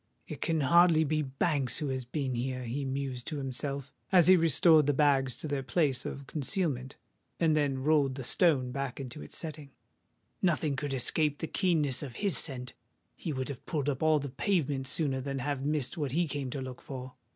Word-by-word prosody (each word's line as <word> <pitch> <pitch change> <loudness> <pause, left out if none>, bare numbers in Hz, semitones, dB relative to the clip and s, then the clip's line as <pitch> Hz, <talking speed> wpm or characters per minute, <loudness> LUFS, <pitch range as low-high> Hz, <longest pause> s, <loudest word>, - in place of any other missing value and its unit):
"It - - -7
can 160 -2 +1
hardly 165 +3 +5
be 155 0 0
Banks 135 -2 0
who 150 -3 -2
has 130 -1 -3
been 130 +1 -2
here," 125 +1 -2
he 130 +4 -3
mused 130 -2 -3
to 150 - -3
himself, 140 +1 -4 0.2
as 180 -3 +6
he 185 - +8
restored 160 -2 +5
the 145 - +2
bags 135 -3 +3
to 145 +5 -7
their 145 -2 -1
place 135 -1 +1
of 140 - -6
concealment, 140 -3 -2 0.4
and 160 -2 +3
then 140 -3 0
rolled 145 -3 +3
the 135 - -5
stone 130 -2 +2
back 135 0 -4
into 125 - -7
its 75 - -7
setting: 155 -3 -6 0.7
"nothing 155 -5 +1
could 140 0 -2
escape 145 +4 +1
the - - -3
keenness 155 -8 +1
of 130 -5 -7
his 200 -6 0
scent! 125 -4 -2 0.4
He 165 - -4
would 130 -1 -3
have 135 -4 -7
pulled 145 -3 -1
up 135 -3 -2
all 155 -1 +4
the 140 -1 -4
pavement 140 -2 0
sooner 135 -3 0
than 135 +1 -3
have 135 0 -2
missed 150 0 -1
what 140 -4 -2
he 170 +2 +2
came 140 -3 -4
to 135 +2 -4
look 130 -1 -7
for. 130 -2 -7
140 Hz, 200 wpm, -30 LUFS, 130-155 Hz, 0.7 s, he